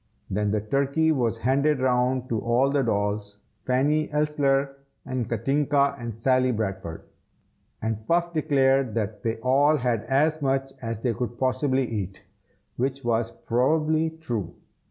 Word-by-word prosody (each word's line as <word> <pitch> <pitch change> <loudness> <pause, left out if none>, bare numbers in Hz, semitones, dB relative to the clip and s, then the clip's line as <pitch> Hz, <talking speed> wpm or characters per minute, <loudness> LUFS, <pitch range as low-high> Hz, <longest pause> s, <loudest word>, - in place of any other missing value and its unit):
Then 105 +2 0
the 105 0 0
turkey 140 +7 +1
was 120 -6 0
handed 135 +5 +2
round 130 0 +1
to 115 - 0
all 120 +5 +2
the 140 -1 +2
dolls, 105 -3 -1 0.3
Fanny 145 +4 +2
Elssler 140 -2 +1 0.3
and 130 -4 -3
Katinka 140 +4 +1
and 120 -2 -6
Sally 130 +2 +2
Bradford; 95 -7 -4 0.8
and 110 -1 -3
Puff 170 0 +1
declared 135 -5 +2
that 105 -2 -2
they 115 +1 -1
all 140 +5 +4
had 120 -5 0
as 155 +3 +2
much 135 -1 0
as 115 -2 -4
they 120 -1 0
could 120 0 -4
possibly 130 0 +1
eat, 100 -4 -5 0.5
which 135 +2 -2
was 115 -1 0
probably 155 +8 +1
true. 120 - -5
130 Hz, 140 wpm, -25 LUFS, 115-140 Hz, 0.8 s, all